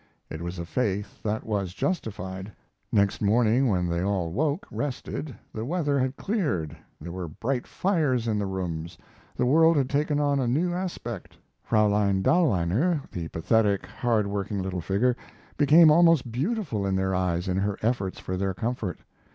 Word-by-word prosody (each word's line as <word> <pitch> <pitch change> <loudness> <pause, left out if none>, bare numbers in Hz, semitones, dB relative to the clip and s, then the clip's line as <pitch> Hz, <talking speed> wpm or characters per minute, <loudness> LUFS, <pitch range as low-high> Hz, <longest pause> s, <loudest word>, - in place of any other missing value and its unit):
It 80 - -5
was 85 +1 -5
a 85 - -4
faith 105 0 -2
that 110 0 -2
was 100 -4 -2
justified. 95 - -3 0.4
Next 100 -1 +2
morning, 115 +4 +3
when 90 -5 +1
they 85 0 -1
all 95 -4 -1
woke, 150 - 0
rested, 145 0 -4 0.2
the 110 - -4
weather 145 0 0
had 130 +1 -1
cleared, 145 - -1 0.2
there 85 +3 -7
were 90 -1 -5
bright 120 - -3
fires 150 - 0
in 105 -2 +1
the 100 - -1
rooms, 85 -3 -4 0.4
the 125 - +1
world 160 +5 +5
had 135 -2 +1
taken 145 0 +1
on 145 -1 +2
a 130 - 0
new 165 +9 +1
aspect. 170 - -5 0.3
Fraulein 105 -3 +2
Dahlweiner, 140 - +2
the 85 -2 -4
pathetic, 100 +5 +1
hard 110 +1 0
working 100 0 -3
little 90 -1 -3
figure, 100 +8 +1 0.4
became 155 +2 +7
almost 165 -6 +4
beautiful 145 - -1
in 95 -1 0
their 95 0 0
eyes 90 -1 0
in 90 0 0
her 100 0 0
efforts 110 -5 0
for 95 - -4
their 95 0 -1
comfort. 115 -5 -3
110 Hz, 165 wpm, -26 LUFS, 95-140 Hz, 0.4 s, became